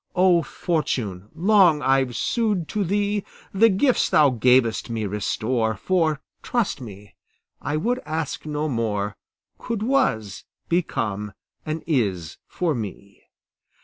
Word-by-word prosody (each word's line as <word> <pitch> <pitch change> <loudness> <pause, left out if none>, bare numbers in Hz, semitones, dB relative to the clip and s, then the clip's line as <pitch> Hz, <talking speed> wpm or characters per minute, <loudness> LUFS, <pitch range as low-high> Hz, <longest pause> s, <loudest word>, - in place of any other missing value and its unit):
O 180 -2 +5
Fortune, 125 - -2
long 175 -4 +4
I've 135 -2 +2
sued 210 -8 0
to 210 -2 -1
thee; 205 +2 0 0.3
The 225 +4 +5
gifts 240 +6 +2
thou 150 -3 +5
gavest 125 -1 +3
me 110 -2 -2
restore, 110 +3 -1
For, 160 - +1 0.2
trust 235 - -1
me, 100 -3 -11 0.5
I 150 +2 -1
would 245 +10 0
ask 155 -1 -3
no 150 0 -2
more, 105 -6 -1 0.4
Could 230 -3 -3
'was' 110 - 0 0.2
become 105 - -1 0.3
an 155 +1 -3
'is' 100 - -1
for 175 -3 -1
me. 100 -4 -7
150 Hz, 120 wpm, -23 LUFS, -, 0.5 s, O